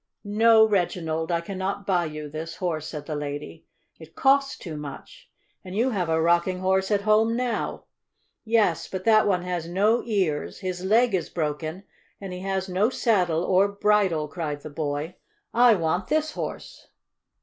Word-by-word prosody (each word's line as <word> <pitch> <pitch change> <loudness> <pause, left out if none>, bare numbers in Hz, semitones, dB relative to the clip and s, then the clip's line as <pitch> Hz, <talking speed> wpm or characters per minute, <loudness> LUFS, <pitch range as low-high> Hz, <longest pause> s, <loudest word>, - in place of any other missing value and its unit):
"No, 220 +2 +5
Reginald, 170 -5 -1
I 170 -1 +1
cannot 195 +2 -4
buy 180 -3 +1
you 155 -1 -6
this 160 +2 -6
Horse," 165 -4 -3
said 150 -2 -7
the 155 - -4
lady. 145 - -6 0.3
"It 160 0 -14
costs 275 0 +3
too 165 -4 -7
much, 150 -2 -9 0.3
and 185 0 -8
you 245 +5 +2
have 180 -6 -1
a 160 0 +2
rocking 170 +2 +2
horse 190 0 +1
at 205 -2 +2
home 215 +2 +3
now." 245 -1 -2 0.6
"Yes, 220 -7 +1
but 190 -1 -5
that 215 -1 +5
one 180 -3 +1
has 175 -2 -3
no 210 +6 +2
ears, 190 -10 -1
his 185 -1 -4
leg 230 +4 +3
is 175 -4 -1
broken, 160 +3 -3 0.4
and 195 -2 -7
he 180 - -6
has 190 0 -2
no 190 +4 +1
saddle 180 -10 +1
or 190 +2 +3
bridle," 200 -6 +1
cried 150 -3 -4
the 155 - -9
boy. 150 +3 -3 0.4
"I 240 -1 +6
want 175 +2 -1
this 310 0 0
horse!" - - -7
185 Hz, 170 wpm, -25 LUFS, 160-210 Hz, 0.6 s, I